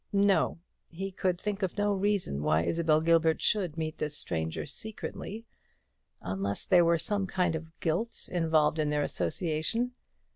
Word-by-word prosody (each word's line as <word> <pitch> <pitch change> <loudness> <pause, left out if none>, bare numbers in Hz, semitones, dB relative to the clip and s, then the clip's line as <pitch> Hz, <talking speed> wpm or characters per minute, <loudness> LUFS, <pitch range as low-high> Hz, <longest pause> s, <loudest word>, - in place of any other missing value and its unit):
No; 200 -2 +3 0.3
he 195 +3 -5
could 185 -1 -1
think 205 0 -3
of 190 +1 -2
no 205 0 +2
reason 195 - 0
why 80 +2 +2
Isabel 160 - +2
Gilbert 165 -1 +3
should 180 -7 +1
meet 155 -1 -3
this 150 -1 0
stranger 80 -2 -2
secretly 220 - -5 0.8
unless 95 +2 -2
there 180 -2 +5
were 170 0 +4
some 195 +4 -1
kind 180 -3 +1
of 160 +1 -8
guilt 185 +9 -2
involved 160 -3 +2
in 150 -1 +1
their 150 0 +1
association. 160 - -1
165 Hz, 150 wpm, -29 LUFS, 155-195 Hz, 0.8 s, there